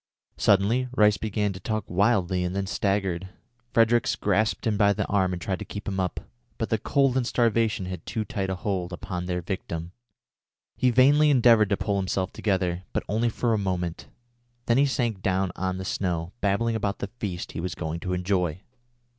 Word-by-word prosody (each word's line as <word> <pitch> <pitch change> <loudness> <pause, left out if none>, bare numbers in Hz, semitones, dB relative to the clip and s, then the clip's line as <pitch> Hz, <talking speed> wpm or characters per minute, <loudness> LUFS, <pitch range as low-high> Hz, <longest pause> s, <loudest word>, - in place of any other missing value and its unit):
Suddenly 110 +6 +3
Rice 105 -3 +5
began 105 -1 -1
to 95 - -8
talk 110 +3 -2
wildly 95 -2 +2
and 90 +1 -2
then 100 0 -1
staggered. 95 -2 -1 0.4
Fredericks 115 0 +3
grasped 105 +2 0
him 110 -2 +1
by 100 0 +4
the - - -2
arm 95 -2 +1
and 90 - -3
tried 95 +1 -3
to - - -4
keep 105 - -7
him 95 -1 -2
up, 90 -1 -2 0.4
but - - -2
the - - +2
cold 135 -2 +2
and 125 -3 +1
starvation 115 -5 +1
had 90 0 -6
too 110 -1 -2
tight 100 -7 -3
a 95 - -1
hold 90 -2 -2
upon 90 -1 -5
their 90 -1 -2
victim. 85 -3 -4 0.8
He 130 - +2
vainly 140 +5 +5
endeavoured 115 -6 +5
to 100 - +1
pull 100 0 -1
himself 95 -1 -1
together, 95 -4 0
but - - -1
only 115 +4 +1
for 115 +1 0
a 110 - +1
moment; 90 -3 -3 0.6
then 120 +2 +3
he 140 - +4
sank 120 -7 -1
down 95 -1 0
on 95 0 -2
the 95 - -5
snow, 85 -3 -2
babbling 110 +3 +1
about 100 -2 -1
the 100 - -5
feast 90 -4 -4
he - - -6
was 85 -1 -3
going 80 0 -4
to 90 +2 -3
enjoy. 90 -2 0
100 Hz, 195 wpm, -26 LUFS, 90-110 Hz, 0.8 s, Rice